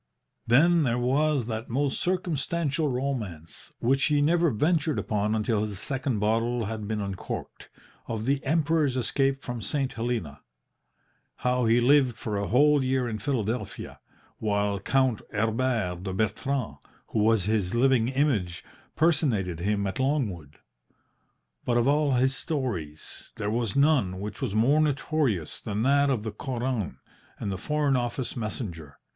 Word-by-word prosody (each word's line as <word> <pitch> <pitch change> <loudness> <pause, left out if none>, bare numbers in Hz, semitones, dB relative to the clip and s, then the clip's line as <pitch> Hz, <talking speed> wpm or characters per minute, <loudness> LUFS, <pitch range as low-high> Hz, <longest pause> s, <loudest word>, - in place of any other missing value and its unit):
Then 165 +8 +5
there 120 -5 +1
was 135 +2 +1
that 110 0 -4
most 135 +3 0
circumstantial 170 -3 -1
romance 120 - -4
(which 135 +3 +2
he 150 -1 +2
never 170 +3 +3
ventured 150 +3 +1
upon 105 +1 0
until 110 0 0
his 105 -2 -3
second 130 +1 -2
bottle 115 +3 0
had 110 0 -5
been 110 0 -2
uncorked) 100 -2 -6 0.4
of 110 -1 -3
the 135 +1 0
Emperor's 150 -2 +1
escape 135 +3 0
from 120 -2 -5
St. 135 +6 -1
Helena 115 - -3 1.0
how 125 -1 +2
he 115 +2 +4
lived 130 -1 +4
for 105 -3 -4
a 100 0 -1
whole 145 +3 +4
year 130 -1 0
in 110 -2 -4
Philadelphia, 110 -3 -3 0.4
while 100 -1 0
Count 130 +2 +1
Herbert 110 -4 0
de 95 -1 -4
Bertrand, 110 - -1 0.3
who - - -1
was 110 -1 +3
his 105 -1 0
living 125 -2 +3
image, 125 - 0 0.3
personated 125 - +1
him 100 +2 0
at 95 - -3
Longwood. 105 - -1 1.1
But 120 -1 +1
of 120 +1 +2
all 145 -1 +3
his 130 +2 +2
stories 105 - -4
there 105 0 -2
was 115 -2 -1
none 140 -11 +3
which 105 0 -6
was 100 - -2
more 135 +8 +4
notorious 140 - 0
than 105 0 -2
that 140 +2 +4
of 125 -6 0
the 110 - -3
Koran 120 -2 -3 0.4
and 100 - -3
the 95 - -3
Foreign 150 -2 +1
Office 120 +1 -2
messenger. 100 - -5
120 Hz, 145 wpm, -27 LUFS, 105-140 Hz, 1.1 s, Then